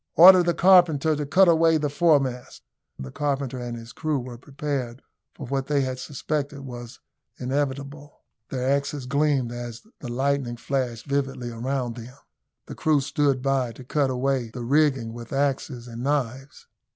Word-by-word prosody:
"Order 185 +2 +9
the 175 -1 +1
carpenter 170 -5 +5
to 145 -1 -3
cut 190 +5 +5
away 165 -1 +4
the 150 -1 -1
foremast." 140 -5 +1 0.3
The 65 -1 -7
carpenter 140 -3 -2
and 120 -1 -5
his 115 +1 -11
crew 155 -2 -1
were 125 -2 -7
prepared 135 -2 -4 0.3
for 145 - -7
what 135 +1 -2
they 145 -2 +2
had 130 -1 -3
suspected 145 0 -4
was 120 -3 -9 0.4
inevitable. 140 +2 -4 0.3
Their 130 -2 -2
axes 140 0 -1
gleamed 140 -2 +1
as 120 -1 -7 0.2
the 120 - -6
lightning 135 -1 -1
flashed 125 -3 -3
vividly 135 -3 -2
around 125 0 -3
them. 120 +3 -10 0.5
The - - -8
crew 155 -2 +2
stood 140 -2 0
by 135 -3 0
to 130 - -12
cut 140 +2 0
away 130 -1 -1
the 120 +2 -7
rigging 135 -3 +2
with 120 -1 -9
axes 135 -3 -1
and 120 0 -8
knives. 135 0 -2
135 Hz, 160 wpm, -25 LUFS, 125-145 Hz, 0.5 s, Order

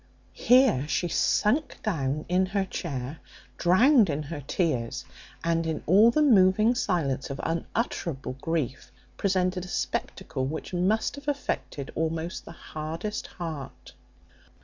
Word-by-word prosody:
Here 245 - +4
she 155 +4 0
sunk 250 - +1
down 150 -7 -1
in 185 +1 +2
her 195 0 0
chair, 140 -5 -5 0.4
drowned 220 - +5
in 150 0 -1
her 145 0 -6
tears, 135 -5 -1 0.4
and, 165 0 +1
in 160 -1 -3
all 205 +7 +6
the 305 +6 +3
moving 215 -2 +5
silence 155 - -1
of 135 - -5
unutterable 165 - -2
grief, 155 -6 -2 0.2
presented 185 -2 0
a - - -8
spectacle 160 -6 -3
which 160 +5 -5
must 200 +9 +1
have 285 0 -11
affected 140 - -3
almost 160 +1 -3
the - - -9
hardest 165 +6 -5
heart. 160 -6 -7
170 Hz, 125 wpm, -27 LUFS, 150-200 Hz, 0.4 s, all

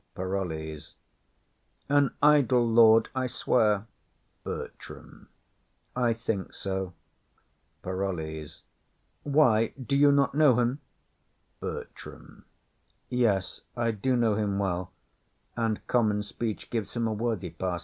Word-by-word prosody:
_] - - -46
PAROLLES. 80 -5 -4 0.9
An 145 -1 +3
idle 135 -5 +5
lord, 115 -1 +6
I 130 -1 -1
swear. 110 -4 +1 0.6
BERTRAM. - - -9 0.7
I 125 -2 +2
think 115 -4 -3
so. 95 -2 -4 0.9
PAROLLES. 80 -5 -4 0.6
Why, 130 -7 +3
do 135 +2 -2
you 145 +1 +6
not 140 -1 +2
know 140 -5 +4
him? 125 +4 0 0.8
BERTRAM. - - -9 0.6
Yes, 110 -7 0 0.2
I 115 -1 +1
do 120 +5 0
know 115 -3 +2
him 100 -1 -1
well; 95 -3 -2 0.6
and 115 -2 -1
common 105 -4 +1
speech 110 +1 -5
Gives 115 -2 -3
him 120 -1 0
a 110 - -1
worthy 105 -5 -2
pass. 90 +2 -3
110 Hz, 110 wpm, -28 LUFS, 95-125 Hz, 0.9 s, lord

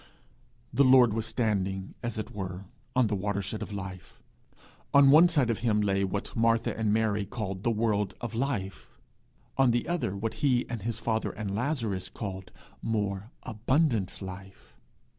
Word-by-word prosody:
The 140 +4 +5
Lord 130 -4 +6
was 115 0 -2
standing, 100 -5 -1
as 120 -1 -4
it 110 - -4
were, 95 -1 -5 0.3
on 130 -1 +4
the 105 - -1
watershed 100 +1 -2
of - - -5
life. 95 -3 -7 0.8
On 140 -1 +8
one 165 +4 +8
side 140 -8 +2
of 115 - -2
him 110 -3 +2
lay 100 -1 +1
what 100 +1 -3
Martha 115 0 +2
and 110 -2 0
Mary 105 -1 +1
called 100 -3 -5
the 120 - +1
world 105 -4 0
of 120 -1 -5
life, 110 - -3 0.6
on 135 -2 +6
the 120 0 +1
other 170 - -1
what 110 +3 -3
he 130 -4 +2
and 115 -3 -5
his 115 +2 -2
father 110 0 -1
and 100 -3 -5
Lazarus 115 - -1
called 95 -3 -6 0.3
more 105 -2 -2
abundant 115 - 0
life. 95 +1 -10
110 Hz, 160 wpm, -29 LUFS, 100-120 Hz, 0.8 s, On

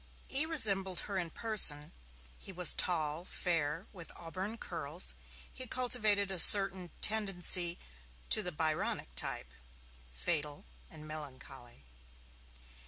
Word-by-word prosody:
E. 280 +4 +1
resembled 195 - +2
her 200 -2 -4
in 170 -2 -5
person, 160 -8 +2 0.5
he - - -10
was 180 -2 +4
tall, 160 -2 -1
fair, 165 -1 -3
with 170 -4 -9
auburn 190 +6 -7
curls; 165 -3 -4 0.4
he 255 -1 -5
cultivated 215 -6 +1
a 190 - -2
certain 190 -1 +6
tendency 180 -5 +2 0.5
to 215 - +4
the 180 -3 -5
Byronic 155 - -3
type, 60 0 -6 0.6
fatal 145 - -4 0.2
and 155 0 -13
melancholy. 135 - -11
175 Hz, 110 wpm, -32 LUFS, 155-200 Hz, 0.6 s, certain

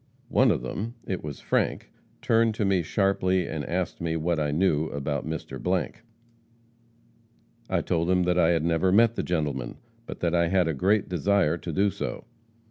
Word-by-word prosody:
"One - - +4
of - - 0
them 115 +4 -4
it 95 - -4
was 75 -2 -7
Frank - - -1 0.3
turned 115 -1 +3
to 105 - 0
me 95 -2 +2
sharply, 95 0 +1
and 80 -2 -4
asked 90 +3 -3
me 80 -1 -1
what 80 0 0
I 75 -1 0
knew 80 0 +1
about 70 0 -3
Mr.. 80 0 -5 2.1
I - - +1
told 85 0 -1
him 90 -1 +3
that 90 0 +1
I 80 - +4
had 80 -2 +1
never 85 +2 +2
met 115 +3 +5
the - - -2
gentleman, 75 -8 -2 0.3
but - - -7
that 85 -1 0
I 85 -1 +3
had 90 -1 +2
a 80 - 0
great 95 +8 +1
desire 90 -1 +1
to 85 - -5
do 100 +4 +2
so. - - -5
85 Hz, 180 wpm, -26 LUFS, 80-95 Hz, 2.1 s, met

